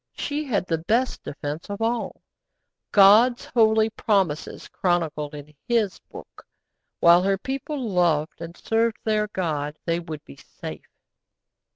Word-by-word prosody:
She 295 +1 -3
had 210 -9 -1
the 165 -3 -1
best 230 +10 0
defence 150 +4 -6
of 200 +1 -5
all 230 +1 -2 0.7
God's 215 +5 +6
holy 220 -1 +3
promises 190 -9 -1
chronicled 160 -4 -1
in 145 +1 -11
His 225 -5 +1
Book. - - -12 0.6
While 170 +1 +7
her 195 +1 +1
people 275 +6 -4
loved 170 -5 +1
and 170 +1 -8
served 225 0 0
their 215 -1 +1
God 155 -7 -3
they 165 0 0
would 160 -3 -8
be 70 - -13
safe. - - -10
195 Hz, 135 wpm, -24 LUFS, 160-225 Hz, 0.7 s, While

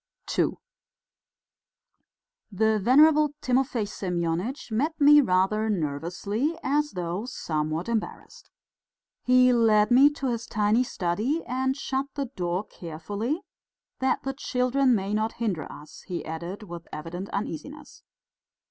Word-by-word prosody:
II - - +2 2.0
The 220 +2 +2
venerable 295 +6 +5
Timofey 255 -4 0
Semyonitch 180 - -3
met 295 +9 -1
me 295 0 +8
rather 215 0 +1
nervously, 190 - -2
as 295 +2 0
though 180 +3 -3
somewhat 155 -4 -3
embarrassed. 230 -2 -4 0.7
He 255 0 +5
led 220 -2 +4
me 270 +4 +7
to 280 - -6
his 235 0 -4
tiny 215 +3 +2
study 230 - -1
and 260 +2 -1
shut 270 0 -2
the 280 -1 -1
door 175 +2 -1
carefully, 205 - -4 0.6
"that 260 0 0
the 270 - -2
children 255 -1 +1
may 195 0 -2
not 215 +1 0
hinder 205 -9 -3
us," 150 +1 -12
he 180 -3 -4
added 170 +6 -6
with 175 -4 -9
evident 170 +5 -6
uneasiness. 215 - -6
220 Hz, 120 wpm, -26 LUFS, 180-265 Hz, 2.0 s, me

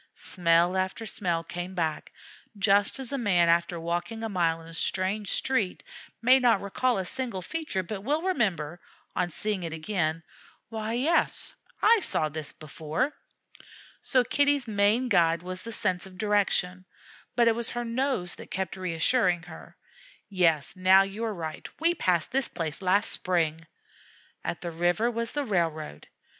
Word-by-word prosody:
Smell 175 0 +2
after 190 +4 -2
smell 175 -6 -1
came 175 +2 -6
back, 160 -3 -2 0.5
just 200 0 +3
as 265 -2 -3
a 275 - -1
man 180 -7 +3
after 170 0 +2
walking 175 +7 -3
a 225 - -2
mile 170 -4 +1
in 165 - -13
a 165 - -11
strange 190 +4 -1
street 225 -9 0 0.4
may 255 +3 +7
not 240 -5 +4
recall 235 +5 0
a 190 - -2
single 235 -4 -4
feature, 310 - -3
but 195 +2 -5
will 300 +7 0
remember, 175 - -1 0.3
on 180 -1 0
seeing 205 +3 -2
it 165 -2 -4
again, 160 -1 -1 0.5
"Why, 220 0 -3
yes, 285 +8 +1 0.3
I 455 +1 +6
saw 155 - +2
that 155 -1 -4
before." 155 - -2 0.9
So 255 -1 +2
Kitty's 285 +1 +2
main 215 +4 +2
guide 170 -6 +3
was 185 0 -5
the 230 - -7
sense 185 -5 -1
of 185 -1 -14
direction, 195 -3 0 0.5
but 235 -1 +4
it 230 - +5
was 230 0 +2
her 240 0 -3
nose 235 -6 -1
that - - -11
kept 190 +1 -3
reassuring 180 +1 +1
her, 175 -2 -12 0.5
"Yes, 170 -7 +1
now 190 +1 +6
you 195 +3 -5
are 220 -2 -2
right 160 -3 -6
we 335 +2 +3
passed 180 - 0
this 270 0 +1
place 160 -2 -4
last 195 +3 +2
spring." 165 -3 0 0.8
At - - -3
the 175 - -4
river 175 +8 +1
was 230 0 -3
the 290 -1 -1
railroad. 165 - -2
190 Hz, 160 wpm, -27 LUFS, 170-230 Hz, 0.9 s, may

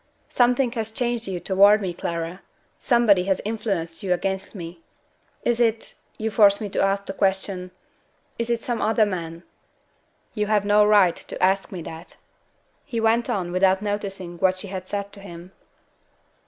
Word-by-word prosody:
"Something 245 0 +2
has 225 -3 -3
changed 235 0 -2
you 185 -2 -3
toward 200 +3 +5
me, 190 -4 -3
Clara. 170 +1 -4 0.4
Somebody 220 -7 +3
has 190 -1 +1
influenced 200 -7 -3
you 185 -2 +1
against 190 +3 -3
me. 170 -2 -8 0.6
Is 240 -1 +1
it 230 -2 0 0.2
you 220 0 -2
force 200 -1 +5
me 210 - -4
to - - -1
ask 195 0 +1
the 195 - -5
question 190 -1 -1 0.7
is 235 0 -2
it 235 -1 -1
some 240 -2 -2
other 220 0 +3
man?" 170 -4 -5 0.9
"You 210 -2 -1
have 210 -1 +2
no 210 +1 +5
right 205 -4 +5
to - - -6
ask 195 +1 +2
me 180 -4 -6
that." 165 +3 -10 0.7
He 240 -5 -4
went 225 +1 +2
on 180 -3 -2
without 190 +2 +2
noticing 195 -4 -4
what 185 +1 +2
she 195 +1 -6
had 185 -1 -6
said 200 0 -4
to 200 - -10
him. 175 -2 -11
200 Hz, 170 wpm, -23 LUFS, 185-220 Hz, 0.9 s, toward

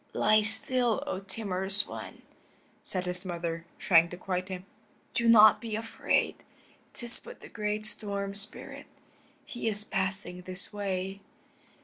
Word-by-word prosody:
"Lie 215 0 +4
still, 235 +4 0
O 285 -10 -3
timorous 195 -1 -2
one," - - -9 0.6
said 185 -1 -4
his 180 0 -4
mother, 170 -2 -4
trying 170 -3 +4
to 175 - -8
quiet 185 0 -3
him. 185 0 -6 0.5
"Do 235 0 +2
not 215 -2 +8
be 225 -3 -4
afraid; 225 +1 0 0.6
'tis 240 -1 -6
but - - -12
the - - -10
great 210 0 -3
Storm 200 -2 -2
Spirit. 205 +2 -5 0.6
He 240 -2 -5
is 210 -1 +1
passing 190 -2 +3
this 185 +3 +4
way." 195 -1 -3
200 Hz, 135 wpm, -29 LUFS, 185-215 Hz, 0.6 s, not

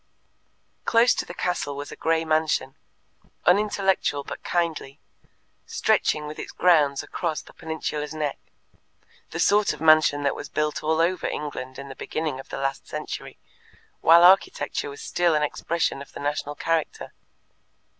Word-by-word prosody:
Close 230 +1 +4
to - - -3
the 175 - -7
castle 170 -6 -2
was 145 0 -6
a - - -7
grey 165 0 0
mansion, 155 -4 +1 0.7
unintellectual 190 -5 +2
but - - -8
kindly, 160 -5 -2 0.7
stretching 150 -1 +1
with 150 +1 -7
its - - -6
grounds 150 -6 +3
across 165 -4 -3
the - - -16
peninsula's 150 -2 -4
neck 150 -3 -3 0.9
the - - -6
sort 205 -3 +3
of 150 - -10
mansion 155 -2 +5
that 140 - +2
was - - -8
built 150 0 -1
all 160 +1 +1
over 175 +2 +1
England 130 -3 -5
in 140 - -8
the 135 - -9
beginning 155 -2 -3
of 135 - -11
the - - -5
last 135 0 -3
century, - - -6 0.6
while 170 +1 +7
architecture 285 - +3
was 430 +1 -9
still 175 - +1
an 150 - +2
expression 155 -1 -1
of 140 - -12
the - - -8
national 145 0 -2
character. 165 -1 -2
155 Hz, 155 wpm, -25 LUFS, 145-175 Hz, 0.9 s, while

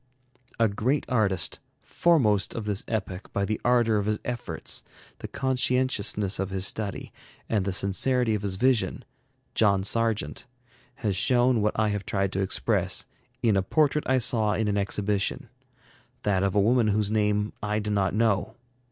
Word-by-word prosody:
A 115 - +5
great 115 +8 0
artist, 100 -9 0 0.2
foremost 115 - +2
of 115 - -4
this 105 -2 -2
epoch 95 -3 -4
by 100 - 0
the 110 +1 -3
ardor 120 -3 +3
of 105 0 -1
his 105 0 +1
efforts, 120 -1 -2 0.4
the - - -6
conscientiousness 125 -7 0
of 95 -1 -1
his 95 -1 -2
study, 105 0 -4 0.3
and 105 -4 0
the 100 - 0
sincerity 110 +6 +1
of 105 - -1
his 100 -2 -2
vision, 125 +2 +1 0.5
John 100 -3 +3
Sargent, 110 - 0 0.6
has 100 -3 +1
shown 120 +3 +3
what 105 0 0
I 110 -1 +2
have 105 -1 -3
tried 100 -1 0
to 95 - -1
express, 95 -1 0 0.4
in 110 -4 +3
a 95 - +3
portrait 150 +8 +1
I 130 - +4
saw 110 -4 +1
in 110 +3 0
an 100 - 0
exhibition; 100 0 -1 0.7
that 100 -3 +1
of 100 0 0
a - - +4
woman 115 +3 +3
whose 105 0 +1
name 105 -1 +1
I 105 +1 -1
do 105 0 -2
not 100 -2 +1
know. 110 0 +1
105 Hz, 165 wpm, -26 LUFS, 100-115 Hz, 0.7 s, A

